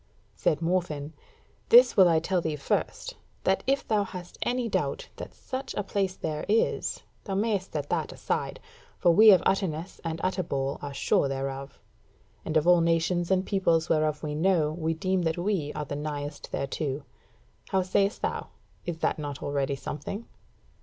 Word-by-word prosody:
Said 155 Hz, -, 0 dB
Morfinn: 165 Hz, -4 st, -1 dB, 0.6 s
"This 485 Hz, +2 st, +8 dB
will 185 Hz, -3 st, +7 dB
I 165 Hz, -, +4 dB
tell 180 Hz, +2 st, 0 dB
thee 160 Hz, -2 st, -2 dB
first: 140 Hz, -, -2 dB, 0.3 s
that 190 Hz, 0 st, +2 dB
if 275 Hz, +1 st, +1 dB
thou 210 Hz, -2 st, +2 dB
hast 180 Hz, -2 st, -9 dB
any 245 Hz, -1 st, 0 dB
doubt 485 Hz, -, -2 dB
that -, -, -7 dB
such 265 Hz, +1 st, -5 dB
a 205 Hz, -, -1 dB
place 195 Hz, -1 st, -1 dB
there 155 Hz, -1 st, -3 dB
is, 225 Hz, +2 st, +1 dB, 0.2 s
thou 195 Hz, -, -2 dB
mayst 200 Hz, -2 st, 0 dB
set 145 Hz, -2 st, -2 dB
that -, -, 0 dB
aside; -, -, -3 dB, 0.4 s
for 175 Hz, -, +4 dB
we 215 Hz, +6 st, +8 dB
of 190 Hz, -4 st, +7 dB
Utterness 185 Hz, -3 st, -1 dB
and 165 Hz, -1 st, -3 dB
Utterbol 150 Hz, -7 st, -1 dB
are 145 Hz, -, -5 dB
sure 140 Hz, -, +2 dB
thereof; 135 Hz, 0 st, -4 dB, 0.6 s
and 155 Hz, -, 0 dB
of 155 Hz, -, +2 dB
all 175 Hz, -1 st, +6 dB
nations 170 Hz, +1 st, +1 dB
and 190 Hz, 0 st, +2 dB
peoples 170 Hz, -4 st, +1 dB
whereof 155 Hz, -1 st, +1 dB
we 150 Hz, -1 st, -2 dB
know, 160 Hz, -1 st, +2 dB
we 160 Hz, 0 st, -2 dB
deem 185 Hz, +3 st, 0 dB
that 160 Hz, -1 st, 0 dB
we 175 Hz, -5 st, -1 dB
are 150 Hz, -, -4 dB
the 145 Hz, -, -5 dB
nighest 145 Hz, -1 st, -5 dB
thereto. 140 Hz, +1 st, -2 dB, 0.7 s
How 190 Hz, -1 st, +2 dB
sayest 195 Hz, +3 st, +1 dB
thou, -, -, -2 dB, 0.4 s
is 170 Hz, -2 st, -2 dB
that -, -, +1 dB
not 145 Hz, -1 st, -5 dB
already 140 Hz, -1 st, -1 dB
something?" 195 Hz, +10 st, -6 dB
170 Hz, 170 wpm, -28 LUFS, 150-190 Hz, 0.7 s, This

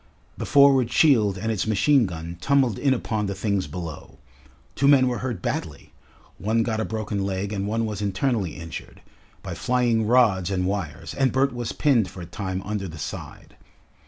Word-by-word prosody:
The -, -, -5 dB
forward 135 Hz, -4 st, +5 dB
shield 110 Hz, -, +4 dB
and 110 Hz, +4 st, -2 dB
its 110 Hz, -1 st, -1 dB
machine 115 Hz, +3 st, +3 dB
gun 85 Hz, 0 st, -7 dB
tumbled 135 Hz, -3 st, +2 dB
in 140 Hz, -, +2 dB
upon 110 Hz, -4 st, -1 dB
the 100 Hz, -, -3 dB
things 100 Hz, -1 st, -1 dB
below. 80 Hz, -6 st, -8 dB, 0.6 s
Two 140 Hz, -, +1 dB
men 135 Hz, -2 st, +6 dB
were 125 Hz, -1 st, -1 dB
hurt 120 Hz, -8 st, -4 dB
badly -, -, -4 dB, 0.5 s
one 110 Hz, +3 st, +1 dB
got 110 Hz, -1 st, -2 dB
a 110 Hz, -, -1 dB
broken 105 Hz, -2 st, -3 dB
leg 95 Hz, +1 st, -2 dB
and 100 Hz, -1 st, -2 dB
one 115 Hz, +2 st, 0 dB
was 105 Hz, -2 st, -4 dB
internally 100 Hz, -, -1 dB
injured 85 Hz, -1 st, -9 dB, 0.4 s
by -, -, -5 dB
flying 120 Hz, -3 st, +1 dB
rods 105 Hz, -7 st, +3 dB
and 90 Hz, -2 st, -1 dB
wires, 95 Hz, -6 st, -4 dB
and 135 Hz, -2 st, +1 dB
Bert 135 Hz, 0 st, +1 dB
was 120 Hz, -2 st, -4 dB
pinned 120 Hz, -10 st, +2 dB
for 90 Hz, -, -10 dB
a -, -, -6 dB
time 95 Hz, +1 st, -4 dB
under 100 Hz, -1 st, -3 dB
the 80 Hz, -1 st, -9 dB
side. -, -, -8 dB
105 Hz, 185 wpm, -24 LUFS, 95-125 Hz, 0.6 s, men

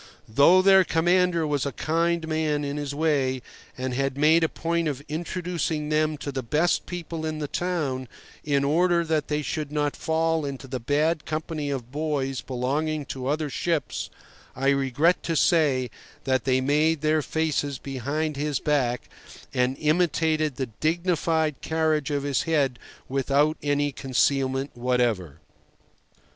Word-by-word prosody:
Though 155 Hz, +11 st, +5 dB
their 190 Hz, -1 st, +7 dB
commander 175 Hz, 0 st, +2 dB
was 145 Hz, -3 st, 0 dB
a 140 Hz, -, -2 dB
kind 165 Hz, +2 st, 0 dB
man 155 Hz, -2 st, 0 dB
in 140 Hz, +1 st, -3 dB
his 145 Hz, -1 st, -4 dB
way, 140 Hz, -5 st, +1 dB, 0.3 s
and 130 Hz, 0 st, -3 dB
had 135 Hz, +1 st, -1 dB
made 160 Hz, +3 st, +5 dB
a 160 Hz, -, +2 dB
point 170 Hz, 0 st, -1 dB
of 140 Hz, -2 st, -3 dB
introducing 165 Hz, -1 st, -3 dB
them 155 Hz, 0 st, +1 dB
to 145 Hz, -, -5 dB
the 135 Hz, -1 st, -3 dB
best 155 Hz, +8 st, +1 dB
people 170 Hz, -2 st, -5 dB
in 155 Hz, 0 st, -2 dB
the 150 Hz, -1 st, -3 dB
town 145 Hz, -8 st, -2 dB, 0.4 s
in 140 Hz, -2 st, +1 dB
order 170 Hz, +4 st, +3 dB
that 160 Hz, -2 st, 0 dB
they 150 Hz, 0 st, -1 dB
should 150 Hz, -1 st, -3 dB
not 145 Hz, -1 st, 0 dB
fall 160 Hz, 0 st, 0 dB
into 140 Hz, -1 st, -5 dB
the 130 Hz, 0 st, -4 dB
bad 150 Hz, +5 st, 0 dB
company 155 Hz, -1 st, -3 dB
of 125 Hz, -3 st, -4 dB
boys 140 Hz, -3 st, -2 dB
belonging 145 Hz, +4 st, -2 dB
to 130 Hz, -1 st, -5 dB
other 150 Hz, +2 st, 0 dB
ships, 165 Hz, +2 st, -2 dB, 0.5 s
I 135 Hz, +2 st, +1 dB
regret 140 Hz, +5 st, +2 dB
to 165 Hz, -, -2 dB
say 140 Hz, -8 st, +3 dB, 0.3 s
that 130 Hz, -1 st, 0 dB
they 130 Hz, -1 st, +2 dB
made 150 Hz, +3 st, +2 dB, 0.2 s
faces 150 Hz, -1 st, -1 dB
at -, -, -23 dB
him 135 Hz, -, -5 dB
behind 145 Hz, +4 st, -2 dB
his 145 Hz, -1 st, -1 dB
back, 125 Hz, -5 st, 0 dB, 0.5 s
and 125 Hz, +1 st, +1 dB
imitated 155 Hz, -2 st, +1 dB
the 130 Hz, -, -2 dB
dignified 160 Hz, -2 st, 0 dB
carriage 160 Hz, -3 st, 0 dB
of 145 Hz, -1 st, -1 dB
his 140 Hz, -2 st, +1 dB
head 140 Hz, -6 st, +1 dB, 0.3 s
without 140 Hz, +3 st, +2 dB
any 145 Hz, 0 st, +1 dB
concealment 135 Hz, 0 st, 0 dB
whatever. 120 Hz, -, -1 dB
150 Hz, 155 wpm, -25 LUFS, 135-160 Hz, 0.5 s, their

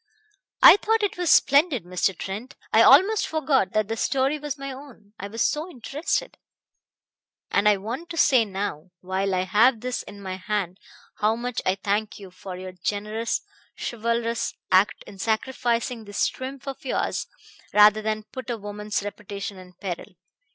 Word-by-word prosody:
"I -, -, +11 dB
thought 445 Hz, +1 st, +1 dB
it 410 Hz, -, 0 dB
was 355 Hz, -2 st, -1 dB
splendid, 280 Hz, -, +4 dB
Mr. 180 Hz, 0 st, 0 dB
Trent 210 Hz, +7 st, -6 dB, 0.2 s
I -, -, +7 dB
almost 420 Hz, +3 st, +6 dB
forgot 300 Hz, -6 st, +1 dB
that 215 Hz, -1 st, +1 dB
the 225 Hz, -, -2 dB
story 270 Hz, +5 st, 0 dB
was 295 Hz, 0 st, -4 dB
my 275 Hz, 0 st, -6 dB
own, 260 Hz, -7 st, -13 dB
I 200 Hz, -, -5 dB
was 225 Hz, +3 st, -1 dB
so 310 Hz, +4 st, -1 dB
interested. 290 Hz, +1 st, -3 dB, 1.1 s
And 205 Hz, +1 st, +4 dB
I 205 Hz, -, +4 dB
want 240 Hz, -, -6 dB
to 335 Hz, -, -6 dB
say 265 Hz, -6 st, +5 dB
now, 190 Hz, -5 st, -4 dB
while 190 Hz, +1 st, -1 dB
I 180 Hz, -, +1 dB
have 215 Hz, +6 st, +3 dB
this 250 Hz, 0 st, -2 dB
in 200 Hz, -, -12 dB
my 190 Hz, -1 st, -5 dB
hand, 190 Hz, -2 st, -3 dB, 0.4 s
how 220 Hz, +1 st, +2 dB
much 245 Hz, +1 st, -3 dB
I 185 Hz, -, +3 dB
thank 205 Hz, +2 st, -2 dB
you 195 Hz, -3 st, -11 dB
for 185 Hz, 0 st, -8 dB
your 185 Hz, 0 st, -7 dB
generous, 210 Hz, +5 st, -2 dB, 0.4 s
chivalrous 235 Hz, 0 st, -2 dB, 0.2 s
act 190 Hz, +3 st, +3 dB
in 195 Hz, -, -13 dB
sacrificing 235 Hz, +1 st, -1 dB
this 205 Hz, 0 st, 0 dB
triumph 265 Hz, +1 st, -8 dB
of 270 Hz, -, -6 dB
yours 265 Hz, -, -1 dB, 0.4 s
rather 210 Hz, +1 st, +6 dB
than 215 Hz, 0 st, -2 dB
put 260 Hz, +3 st, -9 dB
a 235 Hz, -, -2 dB
woman's 210 Hz, 0 st, -4 dB
reputation 200 Hz, -1 st, -6 dB
in 180 Hz, 0 st, -14 dB
peril. 185 Hz, +1 st, -6 dB
215 Hz, 165 wpm, -25 LUFS, 200-260 Hz, 1.1 s, I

